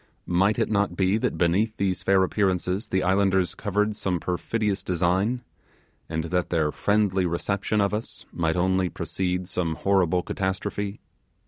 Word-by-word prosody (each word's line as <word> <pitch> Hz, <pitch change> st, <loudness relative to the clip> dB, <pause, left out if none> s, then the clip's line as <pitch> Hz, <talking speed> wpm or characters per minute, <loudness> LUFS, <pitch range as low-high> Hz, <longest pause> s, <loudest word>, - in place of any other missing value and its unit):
Might 95 Hz, +4 st, +2 dB
it 115 Hz, -2 st, 0 dB
not 100 Hz, -3 st, +1 dB
be 95 Hz, +2 st, +2 dB
that -, -, -1 dB
beneath 100 Hz, +6 st, +1 dB
these 95 Hz, -2 st, 0 dB
fair 95 Hz, 0 st, +3 dB
appearances 95 Hz, +1 st, 0 dB
the 95 Hz, 0 st, 0 dB
islanders 95 Hz, -1 st, +2 dB
covered 105 Hz, +1 st, -1 dB
some 90 Hz, -4 st, -1 dB
perfidious 100 Hz, +4 st, -1 dB
design, 95 Hz, +8 st, 0 dB, 0.7 s
and 80 Hz, 0 st, -2 dB
that 90 Hz, +2 st, -1 dB
their 80 Hz, -3 st, +1 dB
friendly 100 Hz, -2 st, +1 dB
reception 100 Hz, +5 st, -1 dB
of 100 Hz, 0 st, +2 dB
us 110 Hz, +2 st, -4 dB
might 80 Hz, -1 st, 0 dB
only 95 Hz, +1 st, +1 dB
precede 90 Hz, +2 st, -2 dB
some 85 Hz, -3 st, -1 dB
horrible 90 Hz, -2 st, +2 dB
catastrophe? 100 Hz, +2 st, -3 dB
95 Hz, 145 wpm, -25 LUFS, 90-100 Hz, 0.7 s, fair